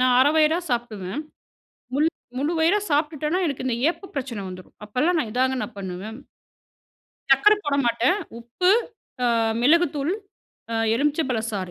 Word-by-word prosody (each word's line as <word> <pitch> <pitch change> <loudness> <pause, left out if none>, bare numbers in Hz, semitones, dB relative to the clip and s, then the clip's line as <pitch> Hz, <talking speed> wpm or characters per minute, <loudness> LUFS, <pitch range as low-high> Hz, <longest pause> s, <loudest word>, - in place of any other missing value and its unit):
நான் 255 -1 +4
1/2 285 +3 +5
வயிறா 315 +2 +4
சாப்பிடுவேன். 230 -1 -3 0.7
மு 280 - +1 0.4
முழு 290 +5 0
வயிறா 340 +6 +4
சாப்பிட்டுட்டேனா, 300 +2 0
எனக்கு 275 -3 -3
இந்த 245 -3 0
ஏப்பப் 385 +2 -11
பிரச்சனை 255 -6 -4
வந்துரும். 185 0 -11
அப்பல்லாம் 300 +11 +1
நான் 230 -8 -2
இதாங்க 260 +1 +1
நான் 240 - -7
பண்ணுவேன். 195 +5 -6 1.1
சர்க்கரை 415 +11 +6
போட 285 -1 +1
மாட்டேன் 235 +9 +2 0.2
உப்பு, 245 +11 0 0.5
அ - - +3 0.4
மிளகுத்தூள், 300 +1 +3 0.6
அ - - -1 0.2
எலுமிச்சை 295 +5 +1
பழ 235 - +1
சாறு, 190 -4 -4
270 Hz, 145 wpm, -24 LUFS, 230-310 Hz, 1.1 s, சர்க்கரை